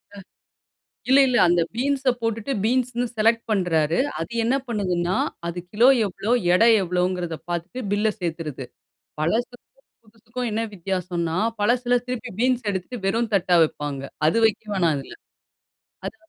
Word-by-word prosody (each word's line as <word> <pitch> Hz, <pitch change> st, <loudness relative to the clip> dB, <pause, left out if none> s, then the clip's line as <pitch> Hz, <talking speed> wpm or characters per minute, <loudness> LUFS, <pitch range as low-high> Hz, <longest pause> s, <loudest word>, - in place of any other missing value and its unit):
அ -, -, -11 dB, 0.9 s
இல்ல, 265 Hz, +2 st, +6 dB
இல்ல. 245 Hz, -, +1 dB
அந்த 175 Hz, 0 st, +3 dB
பீன்ஸ 270 Hz, +1 st, +1 dB
போட்டுட்டு 225 Hz, +3 st, -2 dB
பீன்ஸ்ன்னு 245 Hz, 0 st, 0 dB
செலக்ட் 225 Hz, +2 st, +2 dB
பண்றாரு. 170 Hz, -6 st, +1 dB, 0.2 s
அது 165 Hz, -, -5 dB
என்ன 250 Hz, +4 st, +2 dB
பண்ணுதுன்னா, 185 Hz, -5 st, -1 dB, 0.3 s
அது 175 Hz, +1 st, -5 dB
கிலோ 235 Hz, +5 st, +5 dB, 0.2 s
எவ்வளோ 205 Hz, +4 st, -3 dB, 0.2 s
எடை 230 Hz, +5 st, +5 dB
எவ்வளோங்குறதோ 180 Hz, -2 st, -1 dB
பார்த்துட்டு 175 Hz, +8 st, -4 dB
பில்ல 210 Hz, +1 st, +2 dB
சேர்த்துருது. 160 Hz, -6 st, -4 dB, 0.6 s
பழசுக்கும், 235 Hz, +9 st, -2 dB, 0.4 s
புதுசுக்கும் 230 Hz, +2 st, -6 dB
என்ன 225 Hz, +2 st, -1 dB
வித்தியாசம்ன்னா, 180 Hz, -2 st, -2 dB, 0.2 s
பழசுல 245 Hz, +2 st, +2 dB
திருப்பி 250 Hz, -1 st, -4 dB
பீன்ஸ் 250 Hz, -3 st, +1 dB
எடுத்துட்டு 195 Hz, +6 st, -5 dB
வெறும் 230 Hz, +2 st, 0 dB
தட்டா 180 Hz, -2 st, +3 dB
வைப்பாங்க. 145 Hz, -3 st, -3 dB, 0.3 s
அது 165 Hz, -, +2 dB
வைக்க 220 Hz, +1 st, -4 dB
வேணாம் 170 Hz, -4 st, +2 dB
அதில. 135 Hz, -, -9 dB, 0.9 s
அது -, -, -5 dB
210 Hz, 135 wpm, -23 LUFS, 175-240 Hz, 0.9 s, இல்ல